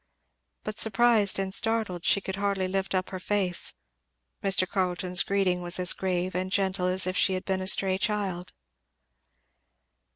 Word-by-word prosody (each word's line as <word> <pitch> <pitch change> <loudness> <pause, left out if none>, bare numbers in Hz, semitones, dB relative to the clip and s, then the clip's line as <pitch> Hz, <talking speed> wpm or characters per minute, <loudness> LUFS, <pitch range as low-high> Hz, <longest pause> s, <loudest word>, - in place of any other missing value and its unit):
But 215 0 -7
surprised 220 -2 +3
and 190 -1 -2
startled 220 -6 +1
she 200 - +3
could 190 0 -6
hardly 200 -2 -2
lift 195 0 -3
up 185 0 -3
her 185 - -6
face. 190 -2 -1 0.7
Mr. 190 -1 +2
Carleton's 180 -1 0
greeting 190 -3 -1
was 175 0 +3
as 180 -1 +4
grave 185 -1 -3
and 185 +1 -4
gentle 190 -1 -1
as 185 0 +2
if 185 0 -3
she 190 - +2
had 185 - -6
been 190 -1 -2
a 185 - -4
stray 190 -1 +3
child. 195 -4 -3
190 Hz, 160 wpm, -26 LUFS, 185-200 Hz, 0.7 s, as